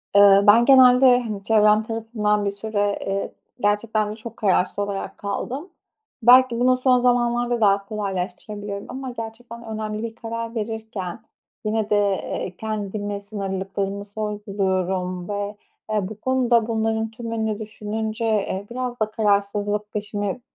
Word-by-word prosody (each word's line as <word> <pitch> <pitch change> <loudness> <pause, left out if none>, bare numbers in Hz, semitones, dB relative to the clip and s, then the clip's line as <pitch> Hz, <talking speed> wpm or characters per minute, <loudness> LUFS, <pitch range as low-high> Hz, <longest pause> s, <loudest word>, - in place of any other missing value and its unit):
Iıı, 200 0 +7
ben 230 +3 +7
genelde, 255 -1 +7
hani, 210 -4 -5
çevrem 215 0 +4
tarafından 220 -2 -1
bir 200 - +1
süre, 205 0 -1
eee, 195 0 -2 0.3
gerçekten 210 0 +1
de - - -6
çok 230 +1 -10
kararsız 190 -2 +1
olarak 200 -1 -3
kaldım. 260 - -4 0.5
Belki 245 0 +6
bunu 255 +1 +4
son 255 -1 +3
zamanlarda 240 -1 +1
daha 200 -1 +3
kolaylaştırabiliyorum 200 0 -4
ama 260 0 -5
gerçekten 235 +1 -8
önemli 215 0 -4
bir 225 -1 -5
karar 230 0 -5
verirken 220 -3 -5 0.4
yine 215 0 0
de, 210 - +3
eee, 195 -2 -1
kendime 205 -1 -4
sınırlılıklarımı 195 0 -4
sorguluyorum 190 -3 -2
ve, 205 0 -3 0.3
eee, 210 -3 0
bu 215 -1 -9
konuda 245 -2 +2
bunların 220 -1 -1
tümünü 225 -2 -3
düşününce, 220 +1 -4
eee, 200 -3 0
biraz 245 0 -4
da 215 0 0
kararsızlık 205 0 0
peşimi 205 +1 -3
215 Hz, 130 wpm, -23 LUFS, 200-230 Hz, 0.5 s, Iıı